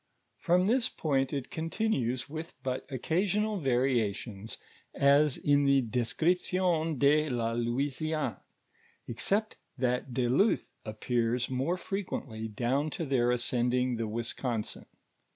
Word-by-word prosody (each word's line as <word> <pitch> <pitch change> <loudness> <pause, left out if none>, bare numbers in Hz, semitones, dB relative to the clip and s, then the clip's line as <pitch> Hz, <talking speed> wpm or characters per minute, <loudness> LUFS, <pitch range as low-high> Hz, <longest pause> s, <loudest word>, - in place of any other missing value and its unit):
From 180 +1 +3
this 235 +3 +3
point, 135 -4 0
it 140 -3 -4
continues 160 - -1
with 160 +3 -7
but 130 +1 -3
occasional 200 - 0
variations, 115 - -1 0.4
ns 140 0 +4
in 145 0 +3
the 140 -1 +4
De 120 +1 -1
scription 180 +9 0
(/<■ 155 -4 +2
la 115 -1 -1
J.iiuiniiini; 135 +1 -1 0.7
except 200 - -1 0.2
thai 125 -1 +1
de 125 0 0
Luth 195 - +2
appears 120 +2 -1
more 135 +8 0
frequently 140 - -4
down 125 +7 0
to 165 - -4
their 130 -4 +2
ascendinir 125 0 +1
the 115 -1 -2
Wisconsin. 115 +1 -3
135 Hz, 115 wpm, -30 LUFS, 120-160 Hz, 0.7 s, ns